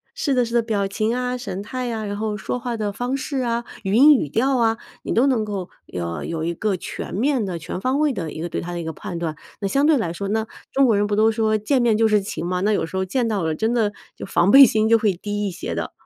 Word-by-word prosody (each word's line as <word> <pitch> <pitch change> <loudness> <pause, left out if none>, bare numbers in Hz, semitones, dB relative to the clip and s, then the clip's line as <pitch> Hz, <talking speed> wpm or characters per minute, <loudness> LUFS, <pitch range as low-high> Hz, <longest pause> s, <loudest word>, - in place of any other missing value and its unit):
是 320 - 0
的 250 -1 +3
是 235 - -5
的， 235 - +5
表 210 -3 -1
情 215 +3 -1
啊、 250 0 -2
神 200 -5 -5
态 250 +3 -4
啊， 220 - -3
然 205 0 -4
后 215 -1 -2
说 250 +3 -3
话 245 -1 -3
的 210 -2 -2
方 245 +6 -2
式 275 +1 -3
啊， 235 -1 -1 0.2
语 195 +1 -1
音、 290 +5 +8
语 240 - 0
调 255 - +1
啊， 225 -1 +2 0.3
你 - - -2
都 240 - +4
能 235 -6 +1
够 195 -4 -4 0.3
呃， 85 -1 -3
有 160 -1 -3
一 170 - -1
个 205 +3 -1
全 175 -1 -6
面 250 +1 +1
的、 180 -3 -3
全 170 +3 -6
方 260 +7 0
位 300 -2 +3
的 170 -9 -4
一 155 - -6
个 170 - -3
对 - - -3
他 175 +1 -5
的 170 - -3
一 - - -5
个 160 - -3
判 170 +2 -7
断。 160 -3 -3 0.2
那 200 - 0
相 280 +5 +2
对 315 - +5
来 175 -8 -1
说 200 +3 -4
那 220 +1 0 0.3
中 275 0 +4
国 220 -4 +3
人 205 0 +1
不 205 - 0
都 220 +1 +4
说 215 -1 +1
见 250 +5 +1
面 225 -3 +3
就 225 - +3
是 210 -1 +4
情 185 -3 -5
嘛， 180 0 -1
那 210 +2 +2
有 180 - 0
时 190 - -6
候 190 - 0
见 245 +6 0
到 200 -5 -1
了 160 -1 0
真 220 +5 0
的 215 -4 +1 0.2
就 - - -6
防 190 0 +2
备 275 0 +10
心 220 -2 +2
就 230 - +6
会 210 -3 +2
低 205 +3 -3
一 - - -3
些 180 - -5
的。 - - -3
215 Hz, 315 characters per minute, -22 LUFS, 190-245 Hz, 0.3 s, 备